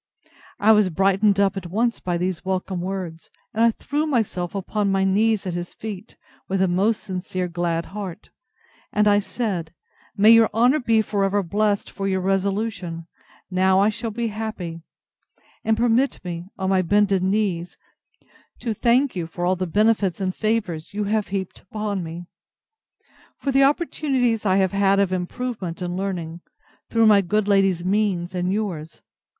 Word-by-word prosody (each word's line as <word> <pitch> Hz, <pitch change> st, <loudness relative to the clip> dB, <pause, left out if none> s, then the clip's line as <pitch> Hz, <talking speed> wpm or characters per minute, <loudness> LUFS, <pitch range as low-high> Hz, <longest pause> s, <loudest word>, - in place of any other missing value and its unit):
I 215 Hz, +2 st, +5 dB
was 210 Hz, -3 st, +5 dB
brightened 195 Hz, +3 st, +2 dB
up 200 Hz, 0 st, +3 dB
at 190 Hz, -3 st, -5 dB
once 230 Hz, +5 st, 0 dB
with 175 Hz, -1 st, -1 dB
these 180 Hz, -2 st, -2 dB
welcome 185 Hz, -1 st, -2 dB
words, 180 Hz, -3 st, -5 dB, 0.2 s
and 225 Hz, -, +2 dB
I 230 Hz, -, +6 dB
threw 295 Hz, +7 st, -2 dB
myself 205 Hz, -, -1 dB
upon 200 Hz, +1 st, -1 dB
my 195 Hz, 0 st, +2 dB
knees 210 Hz, +2 st, +2 dB
at 180 Hz, -, -3 dB
his 175 Hz, 0 st, -5 dB
feet, 215 Hz, -1 st, -8 dB, 0.3 s
with 195 Hz, 0 st, -1 dB
a 190 Hz, -, +3 dB
most 195 Hz, +5 st, +1 dB
sincere 185 Hz, -1 st, -3 dB
glad 170 Hz, -1 st, -2 dB
heart; 200 Hz, -1 st, -8 dB, 0.6 s
and 210 Hz, 0 st, +2 dB
I 205 Hz, 0 st, +5 dB
said, 190 Hz, -6 st, -3 dB, 0.4 s
May 210 Hz, +3 st, +7 dB
your 230 Hz, -1 st, +7 dB
honour 250 Hz, +6 st, +4 dB
be 225 Hz, -4 st, +2 dB
for 205 Hz, -2 st, -1 dB
ever 195 Hz, +1 st, +1 dB
blessed 205 Hz, +3 st, 0 dB
for 195 Hz, -, -3 dB
your 190 Hz, -1 st, 0 dB
resolution! 195 Hz, -2 st, -1 dB, 0.5 s
Now 190 Hz, +1 st, +3 dB
I 200 Hz, +2 st, +4 dB
shall 225 Hz, +2 st, -4 dB
be 230 Hz, +1 st, -2 dB
happy. 205 Hz, -6 st, -5 dB, 0.8 s
And 220 Hz, 0 st, +1 dB
permit 240 Hz, +3 st, +2 dB
me, 175 Hz, 0 st, -5 dB
on 190 Hz, 0 st, -1 dB
my 190 Hz, -1 st, +3 dB
bended 195 Hz, +1 st, +2 dB
knees, 190 Hz, -3 st, -1 dB, 0.8 s
to 230 Hz, -3 st, -3 dB
thank 245 Hz, +4 st, +2 dB
you 170 Hz, -3 st, -3 dB
for 175 Hz, +2 st, -4 dB
all 185 Hz, +1 st, +2 dB
the 185 Hz, 0 st, -3 dB
benefits 205 Hz, -1 st, +2 dB
and 185 Hz, -1 st, -1 dB
favours 205 Hz, -6 st, -2 dB
you 210 Hz, -, 0 dB
have 210 Hz, +1 st, 0 dB
heaped 190 Hz, -2 st, -4 dB
upon 205 Hz, 0 st, -3 dB
me; 165 Hz, +2 st, -7 dB, 1.1 s
for 275 Hz, -, -2 dB
the 270 Hz, +1 st, +4 dB
opportunities 270 Hz, -, +1 dB
I 185 Hz, -, +3 dB
have 190 Hz, -2 st, +2 dB
had 195 Hz, 0 st, +3 dB
of 195 Hz, -2 st, +1 dB
improvement 185 Hz, -1 st, -4 dB
and 175 Hz, -1 st, -3 dB
learning, 175 Hz, -3 st, -4 dB, 0.5 s
through 230 Hz, -1 st, +3 dB
my 210 Hz, -2 st, +6 dB
good 205 Hz, +3 st, 0 dB
lady's 195 Hz, -3 st, +2 dB
means, 190 Hz, -3 st, 0 dB
and 180 Hz, 0 st, -1 dB
yours. 175 Hz, -7 st, -4 dB
195 Hz, 165 wpm, -23 LUFS, 180-215 Hz, 1.1 s, May